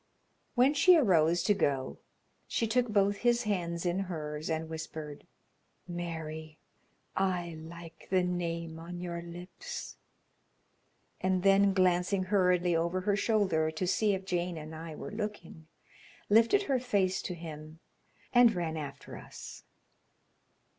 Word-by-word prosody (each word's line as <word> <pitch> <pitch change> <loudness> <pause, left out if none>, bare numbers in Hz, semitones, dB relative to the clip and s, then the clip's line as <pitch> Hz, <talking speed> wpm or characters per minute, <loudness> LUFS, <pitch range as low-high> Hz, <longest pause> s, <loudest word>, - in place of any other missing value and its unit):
When 260 +3 +5
she 360 +4 +6
arose 175 - +3
to 205 - +4
go 135 -9 -1 0.5
she 230 - 0
took 245 +2 +2
both 200 -1 +2
his 240 +2 +2
hands 175 -5 -2
in 175 +2 +1
hers 155 -5 -4
and 160 0 -1
whispered: 155 -2 -7 0.6
"'Mary.' 160 -3 -5 0.6
I 180 -3 0
like 165 0 -11
the 185 -1 +3
name 170 -2 -3
on 175 +2 -7
your 170 -1 -4
lips," 175 +1 -8 1.2
and 185 -1 +1
then 195 0 +5
glancing 185 +1 +2
hurriedly 180 -3 +2
over 170 +3 0
her 200 +1 +1
shoulder 195 -7 +2
to 160 +4 -3
see 205 +2 +2
if 190 0 -7
Jane 175 -2 -1
and 155 0 -8
I 160 0 -7
were - - -7
looking, 210 -7 -6 0.6
lifted 230 - +5
her 270 -8 +1
face 200 -7 +1
to 180 - -4
him 155 -1 -9 0.6
and 240 -3 +6
ran 165 -2 -2
after 140 -2 -7
us. - - -10
175 Hz, 135 wpm, -31 LUFS, 160-200 Hz, 1.2 s, she